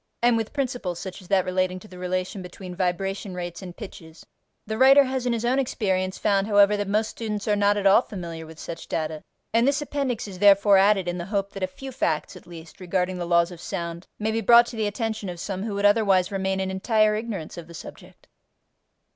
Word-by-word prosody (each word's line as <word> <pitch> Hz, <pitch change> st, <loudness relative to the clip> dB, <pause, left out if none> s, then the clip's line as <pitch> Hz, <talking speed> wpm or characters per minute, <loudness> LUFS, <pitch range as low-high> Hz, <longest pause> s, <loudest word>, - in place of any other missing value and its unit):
and 240 Hz, -1 st, +5 dB
with 225 Hz, -1 st, -2 dB
principles 245 Hz, -, -3 dB
such 190 Hz, +2 st, -7 dB
as 185 Hz, -, -15 dB
that 190 Hz, -1 st, +2 dB
relating 185 Hz, 0 st, 0 dB
to 200 Hz, -, -12 dB
the 180 Hz, -3 st, -12 dB
relation 185 Hz, +2 st, -3 dB
between 180 Hz, 0 st, -9 dB
vibration 190 Hz, +1 st, -2 dB
rates 175 Hz, -2 st, -6 dB
and 180 Hz, -2 st, -9 dB
pitches: 165 Hz, -6 st, -11 dB, 0.4 s
the 220 Hz, -, -3 dB
writer 270 Hz, +4 st, +7 dB
has 260 Hz, -1 st, -2 dB
in -, -, +2 dB
his 230 Hz, 0 st, -2 dB
own 255 Hz, +3 st, +2 dB
experience 190 Hz, -7 st, -1 dB
found, 200 Hz, -1 st, +1 dB
however, 205 Hz, -1 st, +5 dB
that 205 Hz, -1 st, -2 dB
most 215 Hz, +2 st, +1 dB
students 210 Hz, -2 st, -4 dB
are 210 Hz, -, +3 dB
not 205 Hz, 0 st, +3 dB
at 200 Hz, -, -2 dB
all 195 Hz, +4 st, +7 dB
familiar 170 Hz, -7 st, -7 dB
with 160 Hz, 0 st, -12 dB
such 165 Hz, 0 st, -8 dB
data, 155 Hz, -1 st, -3 dB, 0.3 s
and 230 Hz, +3 st, +4 dB
this 280 Hz, +1 st, +2 dB
appendix 275 Hz, -6 st, -2 dB
is 185 Hz, -2 st, -9 dB
therefore 200 Hz, 0 st, +6 dB
added 195 Hz, -2 st, +3 dB
in 175 Hz, 0 st, -2 dB
the 170 Hz, -, -4 dB
hope 200 Hz, -1 st, -2 dB
that 195 Hz, -, -7 dB
a 185 Hz, -, +1 dB
few 265 Hz, +9 st, -9 dB
facts 160 Hz, -11 st, -1 dB
at -, -, -14 dB
least 165 Hz, +1 st, -12 dB
regarding 180 Hz, 0 st, -1 dB
the 175 Hz, -, -3 dB
laws 170 Hz, 0 st, +3 dB
of 175 Hz, -1 st, -10 dB
sound 170 Hz, +1 st, -5 dB
may 215 Hz, +1 st, -1 dB
be 225 Hz, +1 st, -1 dB
brought 235 Hz, +1 st, +7 dB
to 235 Hz, -, -8 dB
the 220 Hz, -2 st, 0 dB
attention 215 Hz, -1 st, -3 dB
of 175 Hz, -1 st, -7 dB
some 190 Hz, +1 st, -4 dB
who 210 Hz, -1 st, -3 dB
would 200 Hz, 0 st, 0 dB
otherwise 205 Hz, -3 st, +3 dB
remain 190 Hz, -1 st, -1 dB
in 190 Hz, 0 st, -2 dB
entire 215 Hz, +2 st, +2 dB
ignorance 215 Hz, -7 st, -4 dB
of 170 Hz, -2 st, -9 dB
the 170 Hz, -, -12 dB
subject. -, -, -12 dB
195 Hz, 230 wpm, -25 LUFS, 180-220 Hz, 0.4 s, writer